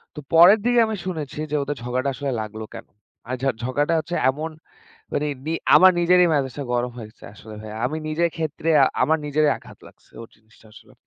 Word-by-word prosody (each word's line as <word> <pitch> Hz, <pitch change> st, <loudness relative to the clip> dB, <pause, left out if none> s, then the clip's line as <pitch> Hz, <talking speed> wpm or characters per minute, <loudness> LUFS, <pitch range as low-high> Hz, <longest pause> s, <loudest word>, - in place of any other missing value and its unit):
তো -, -, -6 dB
পরের 180 Hz, +6 st, +8 dB
দিকে 245 Hz, -1 st, +3 dB
আমি 220 Hz, -, -3 dB
শুনেছি 155 Hz, -6 st, -5 dB
যে -, -, 0 dB
ওদের 145 Hz, +1 st, -4 dB
ঝগড়াটা 130 Hz, +3 st, -1 dB
আসলে 140 Hz, -2 st, -3 dB
লাগলো 110 Hz, +1 st, -7 dB
কেন? -, -, -10 dB, 0.4 s
আর 130 Hz, -, -1 dB
যাক 135 Hz, -2 st, +1 dB
ঝগড়াটা 145 Hz, +6 st, 0 dB
হচ্ছে 165 Hz, +3 st, -5 dB
এমন 155 Hz, +4 st, -3 dB, 0.6 s
মানি 150 Hz, +1 st, -1 dB, 0.2 s
নি 160 Hz, -, -1 dB, 0.2 s
আমার 185 Hz, 0 st, +8 dB
নিজেরই 180 Hz, +1 st, +4 dB
ম্যাজাজ 135 Hz, -4 st, -1 dB, 0.2 s
গরম 120 Hz, 0 st, -1 dB
হয়েছে 110 Hz, -1 st, -12 dB
আসলে 110 Hz, 0 st, -12 dB
ভাইয়া। 110 Hz, 0 st, -9 dB
আমি 155 Hz, +4 st, -4 dB
নিজের 170 Hz, +2 st, +1 dB
ক্ষেত্রে, 160 Hz, 0 st, -4 dB, 0.3 s
আমার 160 Hz, +4 st, +2 dB
নিজেরই 150 Hz, +1 st, +2 dB
আঘাত -, -, -15 dB
লাগছে -, -, -21 dB
ওর 115 Hz, -, -12 dB
জিনিসটা 110 Hz, 0 st, -24 dB
আসলে। -, -, -17 dB
145 Hz, 190 wpm, -22 LUFS, 125-165 Hz, 0.6 s, পরের